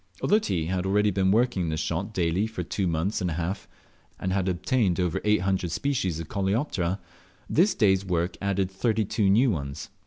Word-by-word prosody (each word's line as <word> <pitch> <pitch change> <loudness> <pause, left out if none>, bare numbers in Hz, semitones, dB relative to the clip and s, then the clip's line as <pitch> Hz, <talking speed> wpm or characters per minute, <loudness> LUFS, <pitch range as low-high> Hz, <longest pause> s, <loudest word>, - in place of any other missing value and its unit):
Although 210 - +4
T 90 - -1
had 90 +2 -1
already 105 +2 +3
been 95 -1 +1
working 100 -5 +2
this 80 0 -2
shot 85 +6 -2
daily 90 +2 0
for 110 -5 -5
two 95 +3 -2
months 85 +6 -1
and 90 - 0
a - - -2
half, 85 +4 -3 0.5
and 95 0 -1
had 95 -1 0
obtained 90 +1 +1
over 90 -2 0
800 95 -3 +1
species 95 - -1
of 80 - -6
Coleoptera, 95 - -1 0.5
this 185 +4 +3
day's 95 - +3
work 90 -1 -1
added 100 -1 0
32 105 0 +1
new 115 +6 +4
ones. 70 -6 -5
95 Hz, 180 wpm, -26 LUFS, 90-105 Hz, 0.5 s, Although